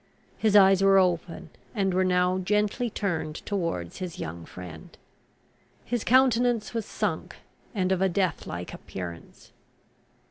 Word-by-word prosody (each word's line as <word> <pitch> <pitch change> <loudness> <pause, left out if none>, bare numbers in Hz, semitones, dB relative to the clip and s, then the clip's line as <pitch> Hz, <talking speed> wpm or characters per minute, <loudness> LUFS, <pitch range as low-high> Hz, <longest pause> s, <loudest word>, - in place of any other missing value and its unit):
His 215 -2 +2
eyes 195 -1 +7
were 195 0 +6
open, 180 -2 0 0.2
and 195 -3 +1
were 185 +1 +3
now 180 0 +2
gently 210 +5 0
turned 170 -8 -2
towards 165 - -3
his 180 -3 -5
young 85 +1 -6
friend. 85 -4 -10 0.9
His 240 -3 -2
countenance 245 -3 +3
was 225 -2 -3
sunk, - - -3 0.4
and 185 -2 +1
of 190 -1 +1
a 190 - +3
death 185 -2 -1
like 90 +1 -6
appearance. 85 -3 -9
185 Hz, 135 wpm, -27 LUFS, 165-210 Hz, 0.9 s, eyes